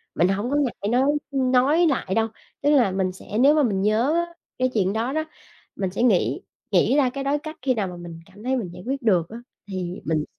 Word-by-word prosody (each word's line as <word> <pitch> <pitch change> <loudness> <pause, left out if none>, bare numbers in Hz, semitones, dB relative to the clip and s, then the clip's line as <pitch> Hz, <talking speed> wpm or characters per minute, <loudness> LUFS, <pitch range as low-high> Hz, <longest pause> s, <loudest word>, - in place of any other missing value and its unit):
mình 175 - +3
hông 200 +5 -1
có - - +1
ngại 255 -8 -1
nói 250 +2 +3 0.3
nói 270 +5 +3
lại 245 -10 -1
đâu. 225 0 +2 0.3
Tức 285 - +2
là 255 -9 +4
mình 190 -1 0
sẽ 195 +3 -7
nếu 280 +4 +6
mà 300 - +4
mình 200 -6 0
nhớ 220 +8 +2
á 340 0 -1 0.3
cái 255 0 +2
chuyện 195 -3 +1
đó 230 +4 -1
đó, 315 +1 0 0.5
mình 190 -2 -2
sẽ 205 - -1
nghĩ 215 -8 +2 0.3
nghĩ 265 - +3
ra 270 -3 +4
cái 275 +2 -5
đối 280 +2 0
cách, 310 +1 -8
khi 260 0 +2
nào 210 -5 -1
mà 180 -1 -8
mình 170 -1 -9
cảm 195 +3 -16
thấy 260 +2 0
mình 210 -8 -3
giải 180 - -10
quyết 270 +2 -2
được 185 -8 +2
á 230 - -8 0.3
thì 185 -2 -5
mình 155 0 0
235 Hz, 245 wpm, -24 LUFS, 190-275 Hz, 0.5 s, nếu